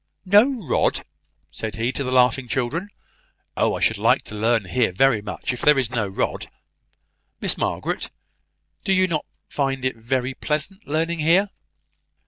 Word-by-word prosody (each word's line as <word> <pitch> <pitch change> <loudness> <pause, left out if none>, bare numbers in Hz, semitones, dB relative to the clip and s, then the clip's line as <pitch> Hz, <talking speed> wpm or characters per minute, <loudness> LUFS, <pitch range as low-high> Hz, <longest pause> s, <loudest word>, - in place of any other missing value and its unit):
"No 210 +3 +4
rod!" - - +1 0.5
said 110 +5 -5
he 115 +3 -1
to 140 - -3
the 130 - -3
laughing 125 0 +3
children. 135 - -2 0.7
"Oh, - - +1
I - - -5
should - - +2
like - - +3
to - - -10
learn 110 0 +1
here 115 +3 +1
very 115 +3 +3
much, 105 +4 -4
if 125 - -7
there 150 -1 +5
is 130 -4 0
no 115 -5 -1
rod. 95 - -3 0.9
Miss - - 0
Margaret, - - -2 0.7
do 195 - +1
you 185 0 +4
not 155 -4 -2 0.2
find 135 -2 -2
it 130 - 0
very 125 +3 -1
pleasant 155 +9 -3
learning 165 +3 -1
here?" 180 +6 +3
130 Hz, 160 wpm, -23 LUFS, 120-165 Hz, 0.9 s, there